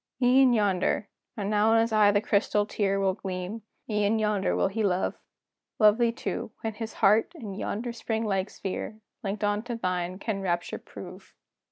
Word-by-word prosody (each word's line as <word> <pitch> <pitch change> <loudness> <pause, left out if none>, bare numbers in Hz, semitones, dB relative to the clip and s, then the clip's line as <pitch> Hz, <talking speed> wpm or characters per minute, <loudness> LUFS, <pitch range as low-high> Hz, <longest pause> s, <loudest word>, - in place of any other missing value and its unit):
"E'en 255 +1 +5
yonder" 205 -2 +1 0.3
and 200 -2 -2
now 210 +1 +3
in - - +5
his 225 0 +1
eye 210 -1 +6
the 205 0 +3
crystal 205 0 +1
tear 195 -2 0
Will 195 -1 +2
gleam 185 +3 -5 0.3
"e'en 210 0 +1
yonder 210 -3 +1
he 210 +4 -3
will 205 - +3
love! 180 +1 0 0.6
Love 215 +1 +5
thee 235 -1 +3
too, 235 - -4
when 225 -1 -3
his 220 +1 -6
heart, 215 +9 +4
in 220 -11 -7
yonder 225 +4 -3
spring 225 -1 -2
like 195 -2 0
sphere, 215 +3 -5 0.2
Linked 205 -1 -3
on 205 0 +1
to 240 +1 -5
thine, 185 -3 -2
can 200 0 -3
rapture 175 -2 -2
prove!" 185 +1 -11
210 Hz, 180 wpm, -27 LUFS, 195-225 Hz, 0.6 s, eye